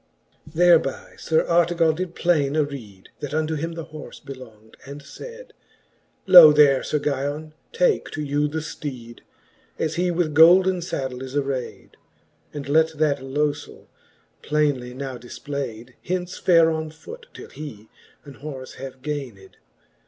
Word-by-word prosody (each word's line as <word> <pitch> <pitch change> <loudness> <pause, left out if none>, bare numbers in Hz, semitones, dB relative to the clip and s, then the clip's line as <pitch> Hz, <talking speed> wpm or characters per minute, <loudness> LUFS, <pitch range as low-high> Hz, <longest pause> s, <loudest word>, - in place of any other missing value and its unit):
XXXV. - - -21
Thereby 165 -5 +3
Sir 160 0 +1
Artegall 170 -1 +2
d^\^ 175 +1 -5
plaine 150 -5 +1
areed. 135 -11 -4
That 145 0 -5
unto 155 0 0
him 165 +2 -3
the 165 -1 -7
horfe 155 -2 -11
belong'd, 115 -5 -12
and 140 +1 -10
fayd; - - -11 0.7
Lo 170 -4 +10
there, 145 -3 +5
Sir 150 - -1
Guyon^ 145 +2 -3 0.2
take 475 -2 +1
to 155 - -5
you 145 +1 0
the 155 +1 -4
fleed, 130 -6 -8 0.6
As 160 +1 -2
he 180 +1 +1
with 170 -3 -1
golden 180 +4 +6
faddle 130 -7 -4
is 130 +1 -7
arayd; 135 -3 -3 0.6
And 145 -2 -7
let 160 +2 +2
that 150 -2 +1
lofell, 145 +2 -3 0.6
plainely 145 -5 -1
now 130 -2 -6
difplayd, 125 -2 -7
Hence 180 0 -3
fare 165 -2 +4
on 160 0 -3
foot, 465 - -12
till - - -11
he 120 -9 -9 0.4
an 140 -2 -12
horfe 135 -3 -8
have 130 -1 -9
gayned. 130 -10 -6
150 Hz, 145 wpm, -23 LUFS, 135-165 Hz, 0.7 s, Lo